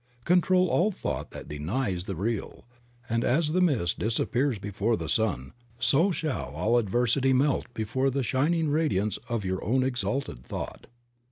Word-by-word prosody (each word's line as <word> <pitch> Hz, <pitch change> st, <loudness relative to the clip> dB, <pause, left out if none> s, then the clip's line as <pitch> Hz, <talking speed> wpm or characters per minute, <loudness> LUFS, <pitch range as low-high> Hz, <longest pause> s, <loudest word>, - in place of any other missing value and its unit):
Control 180 Hz, +1 st, +4 dB
all 175 Hz, +4 st, +3 dB
thought 200 Hz, -, -4 dB
that -, -, -9 dB
denies 90 Hz, -, -2 dB
the 95 Hz, -, -4 dB
real, 105 Hz, +5 st, -3 dB, 0.4 s
and 115 Hz, +1 st, 0 dB
as 150 Hz, +4 st, +2 dB
the 185 Hz, +3 st, +2 dB
mist 125 Hz, -, +1 dB
disappears 120 Hz, +3 st, 0 dB
before 105 Hz, +3 st, -1 dB
the 80 Hz, -, -5 dB
sun 80 Hz, -, 0 dB, 0.2 s
so 145 Hz, +9 st, +3 dB
shall 160 Hz, -6 st, -3 dB
all 120 Hz, +3 st, +2 dB
adversity 120 Hz, +5 st, +2 dB
melt 135 Hz, -1 st, +1 dB
before 115 Hz, +5 st, 0 dB
the 135 Hz, 0 st, -1 dB
shining 155 Hz, +6 st, +1 dB
radiance 125 Hz, -10 st, +1 dB
of 115 Hz, -4 st, -2 dB
your 95 Hz, 0 st, -2 dB
own 130 Hz, +6 st, +2 dB
exalted 120 Hz, -, -2 dB
thought. -, -, -6 dB
120 Hz, 155 wpm, -27 LUFS, 100-145 Hz, 0.4 s, Control